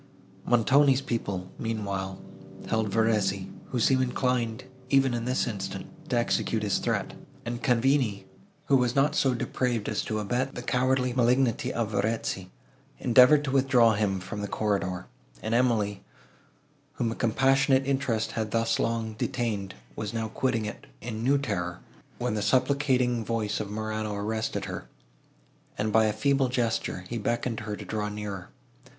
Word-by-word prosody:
Montoni's 130 Hz, +3 st, +4 dB
people, 100 Hz, -8 st, -3 dB
meanwhile, 100 Hz, -4 st, -3 dB, 0.5 s
held 110 Hz, -1 st, 0 dB
Verezzi, 105 Hz, -3 st, +1 dB, 0.2 s
who 125 Hz, -, -2 dB
seemed 130 Hz, +3 st, +4 dB
inclined, 125 Hz, -3 st, 0 dB, 0.3 s
even 135 Hz, -2 st, +4 dB
in 120 Hz, -1 st, -2 dB
this 125 Hz, +1 st, +1 dB
instant, 100 Hz, -5 st, -4 dB, 0.2 s
to -, -, +1 dB
execute -, -, 0 dB
his -, -, +1 dB
threat; -, -, -1 dB, 0.3 s
and 120 Hz, 0 st, -4 dB
Cavigni, 125 Hz, -6 st, +2 dB, 0.4 s
who 135 Hz, -, +4 dB
was 125 Hz, -1 st, +1 dB
not 140 Hz, +2 st, +3 dB
so 130 Hz, -2 st, +2 dB
depraved 120 Hz, -2 st, -1 dB
as -, -, -1 dB
to 110 Hz, -, -2 dB
abet 125 Hz, +6 st, -1 dB
the 125 Hz, -, -5 dB
cowardly 125 Hz, 0 st, +1 dB
malignity 125 Hz, 0 st, +2 dB
of 115 Hz, -2 st, -2 dB
Verezzi, 100 Hz, -3 st, -1 dB, 0.5 s
endeavoured 130 Hz, +4 st, +6 dB
to 140 Hz, -, -2 dB
withdraw 130 Hz, -4 st, +4 dB
him 100 Hz, -2 st, 0 dB
from 95 Hz, +3 st, -6 dB
the 100 Hz, -, -2 dB
corridor; 100 Hz, -4 st, -1 dB, 0.4 s
and 110 Hz, -, -1 dB
Emily, 115 Hz, -5 st, +2 dB, 0.9 s
whom 120 Hz, -5 st, -1 dB
a -, -, -4 dB
compassionate 135 Hz, +3 st, +3 dB
interest 125 Hz, -5 st, 0 dB
had 110 Hz, -1 st, -2 dB
thus 115 Hz, +1 st, +1 dB
long 115 Hz, -1 st, -1 dB
detained, 105 Hz, -4 st, -2 dB, 0.2 s
was 110 Hz, +1 st, -4 dB
now 110 Hz, -1 st, -2 dB
quitting 115 Hz, -2 st, 0 dB
it 105 Hz, -, -7 dB
in 110 Hz, -1 st, -5 dB
new 140 Hz, +3 st, +4 dB
terror, 90 Hz, -10 st, -3 dB, 0.4 s
when -, -, -1 dB
the 105 Hz, -, -1 dB
supplicating 125 Hz, +1 st, +2 dB
voice 110 Hz, -2 st, -1 dB
of 105 Hz, -2 st, -4 dB
Morano 110 Hz, 0 st, -3 dB
arrested 110 Hz, +2 st, -2 dB
her, -, -, -6 dB, 0.9 s
and, 105 Hz, 0 st, -1 dB
by 110 Hz, 0 st, +5 dB
a 110 Hz, -, +2 dB
feeble 135 Hz, +2 st, +2 dB
gesture, 115 Hz, -6 st, -1 dB
he 115 Hz, +2 st, -3 dB
beckoned 115 Hz, +1 st, -1 dB
her 105 Hz, -1 st, -4 dB
to -, -, -9 dB
draw 105 Hz, -1 st, -2 dB
nearer. 105 Hz, -3 st, -6 dB
115 Hz, 155 wpm, -27 LUFS, 105-125 Hz, 0.9 s, endeavoured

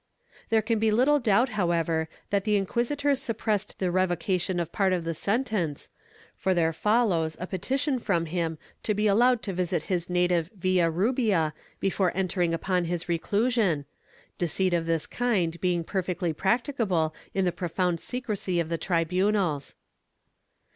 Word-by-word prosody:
There 220 Hz, -1 st, +3 dB
can 225 Hz, 0 st, 0 dB
be 220 Hz, 0 st, +3 dB
httle 265 Hz, +7 st, +3 dB
doubt 235 Hz, +2 st, +3 dB
however 170 Hz, -5 st, 0 dB, 0.2 s
that 200 Hz, -1 st, +2 dB
the 210 Hz, 0 st, +2 dB
inquisitors 265 Hz, +8 st, 0 dB
sup 230 Hz, -5 st, -3 dB
pressed 210 Hz, -2 st, -1 dB
the 185 Hz, -2 st, 0 dB
revocation 185 Hz, 0 st, 0 dB
of 170 Hz, -1 st, -3 dB
part 195 Hz, -2 st, +2 dB
of 175 Hz, -2 st, -1 dB
the 165 Hz, 0 st, -2 dB
sentence, 200 Hz, -, -2 dB, 0.4 s
for 190 Hz, -1 st, 0 dB
there 165 Hz, -1 st, +2 dB
follows 185 Hz, -5 st, +1 dB
a 180 Hz, -, -3 dB
petition 260 Hz, -, -1 dB
from 170 Hz, -7 st, 0 dB
him 165 Hz, -1 st, -2 dB, 0.2 s
to 210 Hz, -, -1 dB
be 210 Hz, +1 st, 0 dB
allowed 235 Hz, +3 st, +4 dB
to 195 Hz, -, -3 dB
visit 175 Hz, -2 st, -1 dB
his 175 Hz, 0 st, -1 dB
native 180 Hz, -2 st, +1 dB
Villarubia 185 Hz, -, +2 dB, 0.3 s
before 190 Hz, -2 st, +1 dB
entering 180 Hz, -2 st, +1 dB
upon 180 Hz, +2 st, 0 dB
his 175 Hz, 0 st, -3 dB
reclusion, 200 Hz, -, +1 dB, 0.5 s
deceit 180 Hz, +2 st, 0 dB
of 165 Hz, -1 st, 0 dB
this 165 Hz, -2 st, 0 dB
kind 185 Hz, -9 st, -1 dB
being 175 Hz, -2 st, +1 dB
perfectly 180 Hz, -2 st, -2 dB
practicable 190 Hz, -, 0 dB, 0.2 s
in 190 Hz, -1 st, +2 dB
the 180 Hz, -, +2 dB
profound 175 Hz, 0 st, -1 dB
secrecy 210 Hz, -7 st, -2 dB
of 165 Hz, -1 st, -1 dB
the 165 Hz, -1 st, -2 dB
tribunals. 180 Hz, -2 st, 0 dB
185 Hz, 150 wpm, -27 LUFS, 170-215 Hz, 0.5 s, allowed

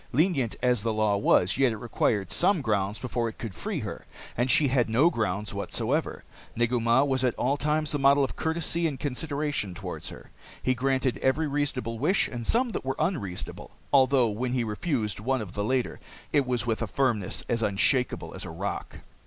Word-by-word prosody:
Lenient 140 Hz, -, +1 dB
as 125 Hz, -3 st, +3 dB
the 115 Hz, +1 st, 0 dB
law 110 Hz, -1 st, +2 dB
was, 100 Hz, +1 st, +3 dB
yet 135 Hz, -3 st, +4 dB
it 110 Hz, -, -4 dB
required 105 Hz, -4 st, 0 dB
some 180 Hz, -4 st, +2 dB
grounds 105 Hz, -2 st, 0 dB
before 120 Hz, -2 st, -2 dB
it 110 Hz, -, -12 dB
could 115 Hz, -5 st, -6 dB
free -, -, -4 dB
her. -, -, -7 dB, 0.3 s
And 120 Hz, +2 st, 0 dB
she 140 Hz, +3 st, +5 dB
had 125 Hz, -3 st, +2 dB
no 140 Hz, +10 st, +4 dB
grounds 105 Hz, -2 st, -2 dB
whatever. 115 Hz, +9 st, -2 dB, 0.3 s
Negu 120 Hz, +1 st, +1 dB
Mah 115 Hz, +3 st, +4 dB
was 130 Hz, -2 st, +1 dB
at 125 Hz, -2 st, +1 dB
all 135 Hz, +3 st, +1 dB
times 150 Hz, +1 st, 0 dB
the 145 Hz, -, -1 dB
model 140 Hz, +1 st, +5 dB
of 135 Hz, -, -2 dB
courtesy 165 Hz, +1 st, 0 dB
and 140 Hz, -4 st, -4 dB
consideration 145 Hz, -, -2 dB
toward -, -, -6 dB
her. -, -, -9 dB, 0.3 s
He 130 Hz, -, +3 dB
granted 130 Hz, 0 st, 0 dB
every 140 Hz, +5 st, +1 dB
reasonable 140 Hz, -6 st, -2 dB
wish 180 Hz, -, +2 dB
and 120 Hz, -2 st, -6 dB
some 245 Hz, +2 st, +3 dB
that -, -, -4 dB
were 135 Hz, 0 st, -2 dB
unreasonable 100 Hz, -, -3 dB, 0.2 s
although 130 Hz, -3 st, +5 dB
when 120 Hz, +4 st, -2 dB
he 125 Hz, -2 st, +1 dB
refused 110 Hz, -, -2 dB
one 130 Hz, +4 st, 0 dB
of 100 Hz, -4 st, -6 dB
the 105 Hz, -, -2 dB
latter, 125 Hz, +3 st, -1 dB, 0.3 s
it 140 Hz, -3 st, +3 dB
was 120 Hz, -4 st, 0 dB
with 115 Hz, -1 st, -1 dB
a 115 Hz, -, -1 dB
firmness 110 Hz, -3 st, 0 dB
as 115 Hz, -1 st, 0 dB
unshakeable 115 Hz, +5 st, +1 dB
as -, -, -5 dB
a -, -, -6 dB
rock. -, -, -5 dB
125 Hz, 195 wpm, -27 LUFS, 110-140 Hz, 0.3 s, she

